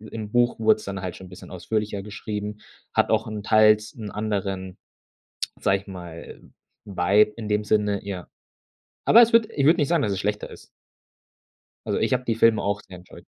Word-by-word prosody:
im 110 -1 -8
Buch 120 0 +2
wurd's 110 -1 +3
dann 100 -1 -5
halt 90 -2 -5
schon 95 - -11
'n - - -18
bisschen 90 - -12
ausführlicher 105 +2 -3
geschrieben, 105 0 -6 0.3
hat - - +2
auch - - +2
'n 105 -1 -5
teils 110 0 +4
'n 110 -3 -7
anderen, 100 -3 -3 0.8
sage 95 - +2
ich - - -27
mal, 85 -3 -10 0.4
Vibe 100 +2 +3
in 110 -2 -6
dem 105 0 0
Sinne, 105 -1 0
ja. 95 -3 -6 0.8
Aber 235 - +8
es 230 - +4
würde 230 -1 +4
ich 140 - 0
würde 160 +3 +5
nicht 145 - +1
sagen, 170 -3 +2
dass 105 - 0
es 95 - -2
schlechter 105 +1 -2
ist. - - -13 1.2
Also - - -1
ich - - +1
hab 125 0 -1
die 115 - 0
Filme 115 -1 +3
auch 100 +1 -1
sehr 90 - -12
enjoyed. 90 +1 -15
105 Hz, 195 wpm, -24 LUFS, 100-110 Hz, 1.2 s, Aber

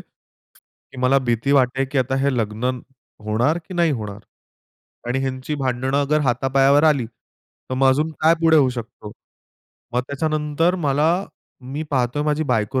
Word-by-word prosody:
की - - -24
मला 130 +2 +4
भीती 120 +4 +1
वाटते 135 -1 +2
की 135 +1 -2
आता 130 +1 0
हे 140 0 +2
लग्न 110 +2 -1 0.5
होणार 120 +10 +1
की 185 - -7
नाही 170 -2 +2
होणार? 105 -5 -5 0.9
आणि 125 +2 0
ह्यांची 130 +2 -3
भांडणं 130 0 -1
अगर 150 +2 +1
हातापायावर 135 +2 +3
आली, 140 -7 +3
तर 120 +2 -13
मग 135 +1 +3
अजून 150 +4 +2
काय 160 +2 +5
पुढे 160 -1 +5
होऊ 140 -3 +5
शकतो? 115 -3 -8 0.8
मग 125 - +2
त्याच्यानंतर 155 +3 0
मला, 150 -3 +1 0.5
मी 135 +4 -5
पाहतोय 130 +1 0
माझी 150 +1 0
बायको 115 -1 0
135 Hz, 150 wpm, -21 LUFS, 125-150 Hz, 0.9 s, काय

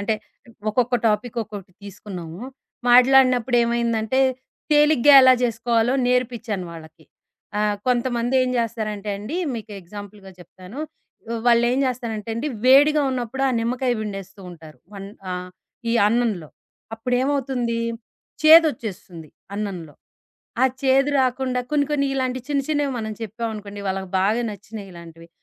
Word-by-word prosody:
అంటే 215 +2 0 0.6
ఒక్కొక్క 245 +2 +1
టాపిక్ 220 +3 -2
ఒక్కొకటి 200 -3 -10
తీసుకున్నాము. 185 -3 -9 0.5
మాట్లాడినప్పుడేమైందంటే, 245 -2 +4 0.5
తేలిగ్గా 295 -2 +5
ఎలా 260 0 +8
జేసుకోవాలో 230 +1 +1
నేర్పించాను 235 -6 -1
వాళ్ళకి. 160 -1 -13 0.6
ఆహ్, 210 -1 +1
కొంతమంది 245 0 0
ఏం 255 - 0
జేస్తారంటే 215 -3 -3
అండి. 235 - -5 0.2
మీకు 225 -1 -7
ఎగ్జాంపుల్‌గా 205 +1 -11
చెప్తాను. 185 - -12 0.5
ఆహ్, 230 -1 -3
వాళ్ళేం 240 +2 +4
జేస్తారంటే 230 -4 -3
అండి. 270 +6 -2 0.2
వేడిగా 290 +3 +6
ఉన్నప్పుడు 255 +1 -3
ఆ - - +1
నిమ్మకాయ 250 +2 0
విండేస్తూ 195 -1 -7
ఉంటారు. 160 -3 -14 0.2
వన్ 195 0 -8 0.2
ఆహ్, 180 0 -5 0.4
ఈ - - +1
అన్నంలో. 215 -9 0 0.5
అప్పుడేమవుతుంది 250 0 -1 0.6
చేదొచ్చేస్తుంది. 220 - +3 0.3
అన్నంలో. 185 -7 -5 0.7
ఆ - - +6 0.2
చేదు 270 +2 +3
రాకుండా 255 0 0
కొన్ని, 290 -1 +2
కొన్ని 280 -1 +1
ఇలాంటి 255 -1 -1
చిన్న, 285 -1 +1
చిన్నవి 290 -3 0
మనం 220 -1 -4
చెప్పావనుకోండి. 215 -2 -6
వాళ్ళకి 190 0 -3
బాగా 215 +5 +2
నచ్చినియిలాంటివి. 180 -6 -11
230 Hz, 115 wpm, -22 LUFS, 200-255 Hz, 0.7 s, ఎలా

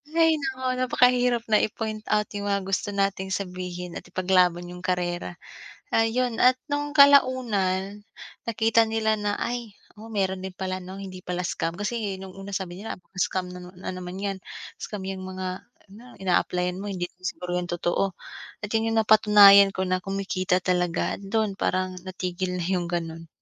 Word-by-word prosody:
Hay 325 -1 +5
naku, 265 -2 -4 0.2
napakahirap 250 -1 +3
na 215 - +6
i-point 215 0 -3
out 210 0 +2
yung 205 0 -3
mga 200 -1 0
gusto 195 +2 -1
nating 195 -1 -1
sabihin 180 -2 -5
at - - -17
ipaglaban 180 -2 +2
yung 180 - -8
karera. 175 -1 -2 0.6
Ayun, 225 +1 +1
at 250 +1 +7 0.2
nung 290 0 -1
kalaunan 220 -9 +4 0.4
nakita 225 0 +3
nila 220 0 +1
na, 205 0 -1
"Ay, 235 -3 -3 0.2
oo, 220 - -10
meron 190 -3 0
din 190 - -4
pala 185 0 -3
'no, 185 +1 -8
hindi 185 -2 -8
pala 180 0 -2
scam," 165 0 -2
kasi 205 -2 -2
nung 190 -1 -9
una 195 +1 -8
sabi 180 -2 -4
nila, 225 - -5
"baka - - -40
scam 185 -1 -1
na - - -7 0.2
na 185 - -5
naman 180 0 -7
yan," 195 -1 -3 0.4
scam 210 -2 -6
yang 190 -1 -4
mga 185 0 -4 0.6
ina-applyan 180 -1 0
mo 205 - -5
hindi 180 -2 -2 0.2
siguro 180 -1 -4
yung 175 - -6
totoo, 175 +2 -1 0.5
at 210 - -5
yun 225 0 +1
yung 225 - +1
napatunayan 205 -2 +8
ko 190 -1 -2
na 185 0 0
kumikita 195 -1 -1
talaga, 180 0 0
dun 215 +1 0
parang 185 0 -1
natigil 180 0 -3
na 175 - -2
yung 180 -1 -1
ganun. 165 -1 -4
195 Hz, 165 wpm, -25 LUFS, 180-220 Hz, 0.6 s, napatunayan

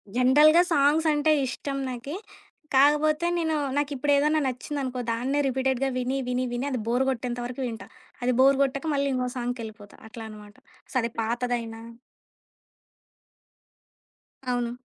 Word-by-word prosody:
జనరల్‌గా 295 +7 +6
సాంగ్స్ 295 +3 +3
అంటే 295 +1 +2 0.2
ఇష్టం 275 +2 -4
నాకి. 255 +5 -6 0.6
కాకపోతే, 300 +4 +4
నేను 320 -2 0 0.2
నాకిప్పుడేదన్నా 290 +1 +2
నచ్చిందనుకో, 260 0 -4
దాన్నే 255 +5 -1
రిపీటెడ్‌గా 265 0 0
విని, 255 +2 -1
విని, 250 +1 0
విని 245 +3 -2
అది 255 - -1
బోర్ 245 +3 +2
కొట్టేంత 245 -1 -3
వరకు 250 +2 -6
వింటా. 225 -1 -7 0.4
అది 250 +1 +2
బోర్ 270 +1 +6
కొట్టక 275 +3 -2
మళ్ళీ 280 0 +1
ఇంకో 250 -1 -1
సాంగ్‌కెళ్ళిపోతా. 225 -4 -6
అట్లా 225 0 -9
అనమాట 210 -1 -12 0.4
సరే 235 -2 +1
పాతదైనా 230 0 -2 2.7
అవును. 240 -1 -1
255 Hz, 120 wpm, -26 LUFS, 240-285 Hz, 2.7 s, జనరల్‌గా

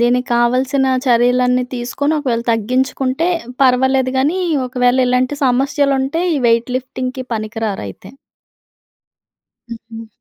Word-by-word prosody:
దీనికి 245 +1 +2
కావలసిన 255 +3 +1 0.2
చర్యలన్నీ 250 +1 +3
తీసుకొని 255 +5 -2
ఒకవేళ 245 -5 -1
తగ్గించుకుంటే, 255 +6 -1 0.3
పర్వాలేదు 260 0 +3
గానీ 295 +8 +1 0.3
ఒకవేళ 250 0 +1
ఇలాంటి 250 +3 +1
సమస్యలుంటే 275 +4 +1
ఈ - - 0
వెయిట్ 230 +2 +1
లిఫ్టింగ్‌కి 255 0 -5
పనికిరారయితే. 215 - -5 1.6
హుహు. 225 0 -9
250 Hz, 95 wpm, -17 LUFS, 240-265 Hz, 1.6 s, చర్యలన్నీ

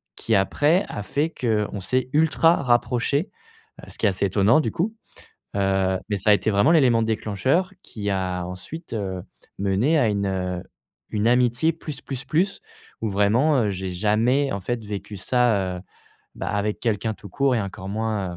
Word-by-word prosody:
qui 115 - 0
après 150 - +2
a 105 - -4
fait 150 +8 -1
qu'on 105 -6 -1
s'est 130 +6 -1
ultra 160 +2 +4
rapprochés. 125 - +1 0.5
Heu, - - -23
ce - - -10
qui - - -1
est - - +5
assez 95 +1 -1
étonnant 100 - +4
du - - -2
coup, 210 +7 -1 0.6
heu, 95 -1 +1
mais 105 - +1
ça 100 +3 0
a - - +9
été 105 - +1
vraiment 100 +11 +4
l'élément 125 -8 +4
déclencheur 130 - 0
qui 105 -2 -5
a 90 -2 -2
ensuite, 120 - -8
heu, 95 -4 -3 0.4
mené 100 +11 +2
à 120 - +3
une, 100 -1 0
heu, 90 -2 -2 0.5
une 105 +1 +1
amitié 125 +6 +3
plus 150 -4 -7
plus 135 -1 -5
plus 185 +6 0 0.4
où 110 - -1
vraiment, 115 +10 +3
heu, 100 - 0
j'ai 95 0 -4
jamais, 115 +9 +1
en 100 - -3
fait, 115 +2 -3
vécu 105 0 -6
ça, 100 -5 +1
heu, 90 - -8 0.5
bah, - - -5
avec 105 +1 -1
quelqu'un 110 -1 -1
tout 100 -2 -12
court 135 +1 +1
et 115 - +1
encore 95 -1 -6
moins, 105 -4 -2
110 Hz, 180 wpm, -23 LUFS, 100-135 Hz, 0.6 s, a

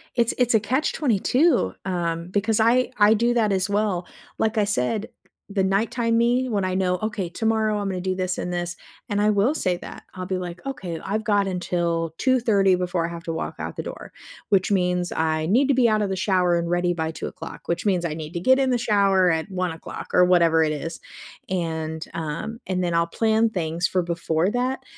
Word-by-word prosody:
It's 235 -1 +2
it's 250 -1 +2
a 220 - +5
Catch-22, 255 - +1
um, 170 -2 -2
because 205 +3 +1
I 240 +4 +3
I 210 +1 +6
do 235 +2 +2
that 220 -3 +2
as 190 0 0
well. 200 -4 0 0.3
Like 220 0 0
I 210 - +4
said, 205 - -1 0.4
the 200 -1 0
nighttime 230 +4 +1
me, 245 +2 +2
when 200 -4 0
I 185 0 -1
know, 180 -1 +1
"Okay, 215 -5 -2
tomorrow 220 +2 0
I'm 205 -1 -2
gonna 185 -2 -3
do 185 0 -1
this 185 -1 -2
and 180 - -3
this," 175 0 -3 0.3
and 205 -1 0
I 210 - +3
will 215 +8 +2
say 180 - 0
that. - - -10
I'll 185 -1 -6
be 185 0 -2
like, 180 -1 -6
"Okay, 185 -12 -5
I've 215 +3 -3
got 205 -2 +2
until 170 -3 -1
2:30 220 -7 +3
before 180 -2 -1
I - - -6
have 170 0 -8
to 165 - -3
walk 160 - -4
out - - -5
the - - -3
door, - - -8 0.4
which 195 0 +2
means 180 -1 0
I 155 -1 0
need 250 - +3
to - - +5
be 250 -2 +4
out 215 -1 +2
of 205 - 0
the 190 - -2
shower 180 -3 +2
and 170 0 -2
ready 175 0 +1
by 160 -2 -2
2:00, 160 0 -7
which 170 +3 -1
means 185 -4 +2
I 165 -3 -2
need 155 0 -7
to 170 - -3
get 260 +7 +4
in 265 -1 +2
the 245 - +2
shower 195 -5 +3
at 160 +3 -2
1:00," 180 -3 -4
or 180 - +6
whatever 170 -3 +4
it 155 -1 0
is, 165 +3 -5 0.5
and, 160 -3 -3
um 165 +8 -4
and 185 -1 -1
then 175 -1 -1
I'll 170 0 +2
plan 220 +4 +2
things 170 -3 -1
for 185 - 0
before 170 0 0
that, 250 +3 -1
190 Hz, 215 wpm, -23 LUFS, 170-220 Hz, 0.5 s, I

